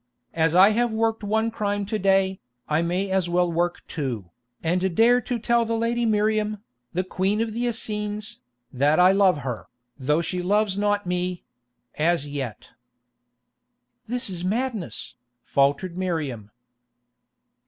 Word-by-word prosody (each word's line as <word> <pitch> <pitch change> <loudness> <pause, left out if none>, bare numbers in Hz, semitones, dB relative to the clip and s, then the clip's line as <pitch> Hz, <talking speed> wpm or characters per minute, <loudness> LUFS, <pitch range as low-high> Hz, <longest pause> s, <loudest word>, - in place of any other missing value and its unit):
"As 165 0 +2
I 190 +3 +8
have 240 +2 +1
worked 225 0 0
one 220 +2 +1
crime 205 -2 -1
to 215 +2 -2
day, 190 0 +2 0.3
I 155 +1 +2
may 180 +3 -1
as 190 -2 +1
well 175 0 +2
work 170 +1 -1
two, 120 - -4 0.3
and 180 +2 0
dare 240 +4 +5
to 245 0 -2
tell 235 +1 +2
the 230 0 -1
lady 235 +1 0
Miriam, 215 0 +1 0.3
the 185 - -1
Queen 190 +3 0
of 225 -1 -1
the 240 +2 -1
Essenes, 215 -1 -4 0.3
that 145 +5 +3
I 180 +1 +7
love 190 -6 +3
her, 125 -4 -4 0.3
though 150 +5 +1
she 180 +2 -2
loves 205 +2 +1
not 205 0 0
me—as 165 -3 -3
yet." 135 -6 -5 1.4
"This 245 +2 -3
is 180 -3 -5
madness," 215 - -2 0.3
faltered 140 +6 +1
Miriam. 155 - -3
190 Hz, 140 wpm, -24 LUFS, 165-215 Hz, 1.4 s, I